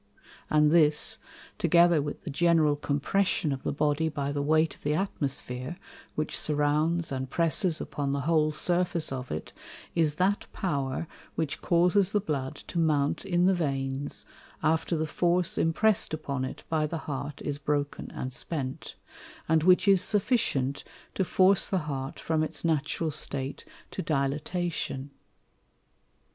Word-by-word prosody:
And 150 0 +4
this, 155 -3 +3 0.4
together 170 -2 +5
with 145 0 -5
the - - -5
general 160 -1 +3
Compression 150 +4 0
of 135 -1 -3
the - - -2
Body 150 +2 +1
by 140 -2 -3
the 145 0 -1
weight 155 +2 +2
of - - -20
the 150 +1 0
Atmosphere, 140 -5 -3 0.4
which 155 0 -2
surrounds 150 +3 +1
and 130 -1 -3
presses 165 +2 +2
upon 140 -1 -3
the 140 0 -1
whole 155 +1 +2
Surface 175 0 0
of 130 -1 -5
it, - - -5 0.4
is 160 -3 +2
that 190 +4 +1
Power 140 -5 -2 0.3
which 160 -3 -2
causes 180 +3 +3
the 210 - +4
Blood 140 -8 -3
to 170 - -3
mount 150 0 +1
in 175 -2 +2
the 190 - +5
Veins, 135 -4 -2 0.4
after 160 +1 +1
the 155 - 0
force 175 +3 +1
impress'd 175 +1 +2
upon 140 -4 -3
it - - -7
by 155 -1 +1
the 160 +1 -5
Heart 145 0 -5
is 145 -1 -3
broken 145 -1 -2
and 130 0 -5
spent, 135 -2 -5 0.5
and 160 0 +3
which 180 +3 +4
is 195 -2 +6
sufficient 190 - +1 0.3
to 190 - 0
force 185 +1 +4
the 185 -5 -1
Heart 135 -2 -4
from 160 -1 0
its 155 +1 -3
natural 155 0 0
State 135 -1 -3 0.3
to - - -4
Dilatation. 150 -1 -2
155 Hz, 150 wpm, -28 LUFS, 140-170 Hz, 0.5 s, is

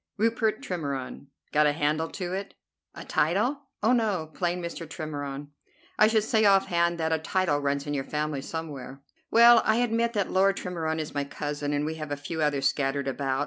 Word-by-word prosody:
"Rupert 220 0 +1
Tremorne." 140 -6 -4 0.2
"Got 150 0 +4
a 145 - +2
handle 155 +2 0
to 180 -2 -5
it?" 195 +1 -5 0.4
"A - - -8
title? 245 - 0 0.2
Oh, 225 - +4
no! 205 -10 0
Plain 175 0 -1
Mr. 170 -2 -6
Tremorne." 145 -2 -5 0.5
"I 215 - +7
should 220 -1 +2
say, 220 0 +2
off 195 -2 +5
hand, 170 0 +1
that 160 -1 0
a 160 - +1
title 160 -2 0
runs 140 0 -1
in 145 - -3
your 135 -2 -1
family 150 -1 -2
somewhere." 140 -3 -7 0.3
"Well; 235 0 +7
I 220 - +3
admit 235 0 +1
that 205 -3 -1
Lord 195 +1 +3
Tremorne 160 -3 -3
is 155 -1 -4
my 145 -1 -1
cousin, 145 +1 -4
and 145 0 0
we 155 - -2
have 155 - -5
a 145 - -2
few 160 +3 -5
others 140 -2 +2
scattered 140 -1 -1
about. 135 0 -1
160 Hz, 195 wpm, -27 LUFS, 145-195 Hz, 0.5 s, I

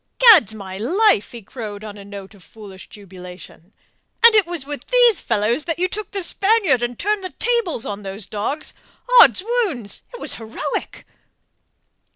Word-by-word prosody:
"Gad's 370 - +6
my 190 -2 -8
life!" 330 - +2
he 235 -3 -10
crowed 210 -1 -8
on 210 -1 -8
a 200 - -11
note 200 0 -10
of 195 -3 -18
foolish 195 -1 -13
jubilation. 180 -2 -13 0.5
"And 465 - +9
it 420 -5 +3
was 345 -5 -5
with 290 0 -8
these 485 -6 +4
fellows 230 +6 0
that 330 -2 -3
you 365 +1 0
took 415 +1 -6
the 395 -2 -4
Spaniard 390 - +1
and 240 -1 -3
turned 415 +1 -1
the 370 - -4
tables 470 - 0
on 205 0 -5
those 195 +1 -6
dogs! 220 - -4 0.5
Oddswounds! 380 - +1
It - - -10
was - - -2
heroic!" 225 +1 -5
240 Hz, 165 wpm, -20 LUFS, -, 0.5 s, And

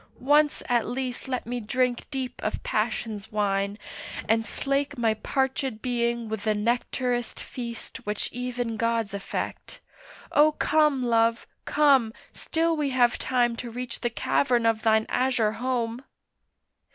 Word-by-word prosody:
once 295 +3 +3
at 240 -2 +2
least 255 +1 -4
Let 255 -1 -2
me 245 +1 -3
drink 245 +2 0
deep 265 -3 -4
of 215 - -2
passion's 215 -1 -2
wine, 200 -1 0 0.5
and 225 +1 +3
slake 280 +3 -1
My 230 -2 +2
parchèd 265 0 -1
being 235 -1 -1
with 220 -1 -4
the 215 -1 +2
nectarous 240 +2 0
feast 235 -2 -7
Which 210 0 -3
even 245 -2 -3
gods 230 -3 0
affect! 200 -1 -5 0.5
O 300 +1 +5
come, 300 -4 +2
Love, 230 -1 +2 0.2
come, 275 -7 +4 0.2
Still 330 0 0
we 295 -2 0
have 245 -2 +3
time 240 -2 +1
to 240 - -5
reach 250 +2 -6
the 240 - 0
cavern 240 0 +1
of 225 -1 +2
thine 220 0 +3
azure 250 -4 +1
home. 240 0 -2
240 Hz, 140 wpm, -26 LUFS, 225-260 Hz, 0.5 s, O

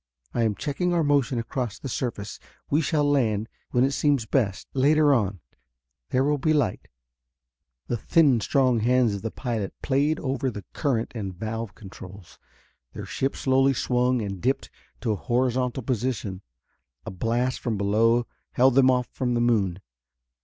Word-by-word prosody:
I 120 - 0
am 110 -3 +1
checking 175 - -1
our 165 - +2
motion 140 -3 +2
across 115 -1 -3
the - - -7
surface. 115 -5 -4 0.3
We 150 +3 +3
shall 150 -1 +1
land, 115 -7 +1 0.2
when 125 - +2
it 135 - +2
seems 140 -4 +1
best, 105 -5 0
later 145 +2 +4
on. 100 - 0 0.7
There 130 - +2
will 145 +1 +1
be 155 +3 +2
light." 140 -11 0 1.0
The 120 - -2
thin 140 0 +3
strong 130 +1 +2
hands 120 0 +3
of 100 - -4
the 115 - -3
pilot 110 -4 -4
played 145 +3 +1
over 135 -1 -1
the 105 -4 -8
current 125 -7 -1
and 100 -6 -5
valve 110 +2 -5
controls. 95 -2 -12 0.5
Their - - -7
ship 135 +1 -2
slowly 135 +1 +3
swung 125 -1 +1
and 100 -3 -5
dipped 130 +3 -1 0.3
to 115 - 0
a - - +1
horizontal 125 +3 0
position. 115 -5 -2 0.6
A - - -5
blast 120 +6 -1
from 115 -3 -2
below 115 +4 +2 0.3
held 130 +1 +4
them 130 0 +5
off 125 -1 +2
from 125 -2 -1
the - - +1
moon. 100 -6 +1
125 Hz, 160 wpm, -25 LUFS, 110-135 Hz, 1.0 s, them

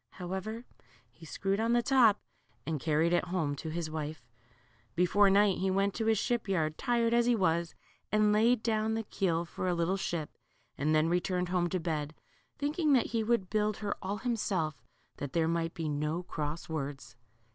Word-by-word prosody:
However, 190 +6 -5 0.5
he 165 - -14
screwed 195 +5 -1
on 230 +1 +1
the 240 0 +3
top, 240 -6 +5 0.5
and 160 -2 -2
carried 160 +3 +1
it 175 - +2
home 165 -5 -1
to 160 - -5
his 165 0 -3
wife. 155 -3 -5 0.7
Before 195 +3 +4
night, 200 0 +4
he 190 - +1
went 195 +1 +1
to 225 -1 -2
his 220 -1 +3
ship 240 +1 -1
yard, 155 -5 0
tired 235 0 +1
as 235 0 +3
he 245 - +4
was, 170 -4 0 0.4
and 215 0 +4
laid 225 +2 +3
down 220 -1 0
the 225 - -2
keel 175 -5 -1
for 185 - -4
a 180 - +1
little 170 +3 0
ship, 170 -5 -3 0.4
and 155 +2 +1
then 155 +1 +3
returned 180 +1 0
home 180 -1 +1
to 185 - -1
bed, 155 -3 -3 0.4
thinking 300 +1 +1
that 250 -4 +2
he 225 -1 +1
would 215 -5 0
build 215 -1 +1
her 205 -2 -2
all 200 +2 -3
himself, 200 - -1 0.4
that 145 -2 -5
there 165 -1 +2
might 165 0 -1
be 165 -2 -3
no 150 +4 -2
cross 155 -1 -4
words. 145 -5 -5
185 Hz, 190 wpm, -31 LUFS, 160-220 Hz, 0.7 s, top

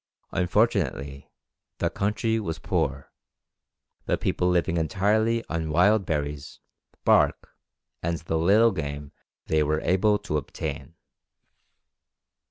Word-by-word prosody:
Unfortunately 90 - 0 0.5
the - - -1
country 110 +3 0
was 80 -7 -4
poor, 70 0 -2 1.0
the - - +1
people 90 - 0
living 85 -1 +1
entirely 110 +7 +1
on 80 -1 -3
wild 95 +5 +3
berries, 75 -2 -3 0.5
bark, - - +3 0.5
and 85 0 -1
the 80 0 -2
little 105 +7 +5
game 70 -5 -5 0.3
they 80 -1 +1
were 75 +1 +1
able 100 +4 +2
to 100 -7 -3
obtain. 75 +3 -6
85 Hz, 105 wpm, -26 LUFS, 75-105 Hz, 1.0 s, little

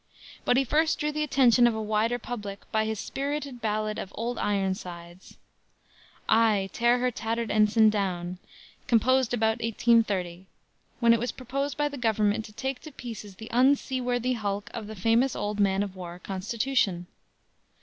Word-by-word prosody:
But 245 - +3
he 270 - +4
first 310 +5 +2
drew 300 0 -1
the 305 0 -3
attention 255 -4 +5
of 235 - 0
a - - -3
wider 215 +3 +1
public 210 -4 -6
by 220 0 +1
his 220 -1 -3
spirited 280 -2 -4
ballad 215 -1 -1
of 190 - -6
Old 235 +1 -3
Ironsides 185 -3 -3 0.9
"Ay! 215 -4 +3
Tear 240 +1 +3
her 250 0 0
tattered 230 0 -3
ensign 215 +1 +4
down!" 180 -3 -2 0.5
composed 255 +2 +3
about 225 -1 +1
1830, 205 -6 +1 0.5
when 235 0 +6
it 230 - +2
was 245 +2 -2
proposed 275 +3 -4
by 295 0 +1
the 285 -2 -7
government 215 -2 +1
to - - -11
take 265 +4 -4
to 310 - -10
pieces 220 -7 -8
the 220 +3 -10
unseaworthy 255 -1 +2
hulk 205 -3 -3
of 220 -3 -6
the 220 - -7
famous 230 +6 +2
old 210 0 -3
man 195 -1 +2
of 195 -2 -6
war, 175 -2 -8
"Constitution." 195 0 -1
225 Hz, 160 wpm, -27 LUFS, 205-245 Hz, 0.9 s, when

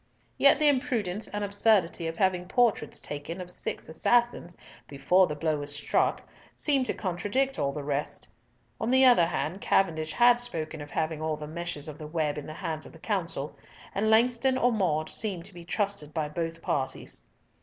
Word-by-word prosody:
Yet 280 - +6
the 305 0 +4
imprudence 230 -8 0
and 205 0 -4
absurdity 200 -4 +2
of 165 0 -5
having 185 -2 +1
portraits 240 +2 +1
taken 145 +5 -6
of 180 -1 -7
six - - -4
assassins 235 +1 +1 0.3
before 160 +8 +3
the 150 - -4
blow 155 0 0
was 145 0 -4
struck 145 - 0 0.3
seemed 275 -4 +1
to - - -1
contradict 210 +9 -1
all 140 -1 +1
the 145 +1 -5
rest. 145 0 -3 0.5
On 225 - -1
the 260 +1 +5
other 240 -10 +6
hand, 175 +2 -3
Cavendish 160 -5 +1
had 240 0 +5
spoken 160 -10 -4
of 145 - -8
having 155 0 -2
all 155 -1 -1
the 150 - -7
meshes 170 -2 -5
of 150 -1 -8
the 155 - -7
web 150 -2 -1
in 145 - -9
the 155 - -6
hands 155 -1 -4
of - - -15
the - - -12
Council; 170 -8 -2 0.4
and 215 +2 +1
Langston 245 +3 +3
or 245 -1 +3
Maude 165 -8 0
seemed 195 -6 -3
to 200 - -8
be 175 -1 -10
trusted 195 -4 -2
by 155 -2 0
both 165 +1 -4
parties. 135 -2 -3
175 Hz, 185 wpm, -28 LUFS, 155-220 Hz, 0.5 s, Yet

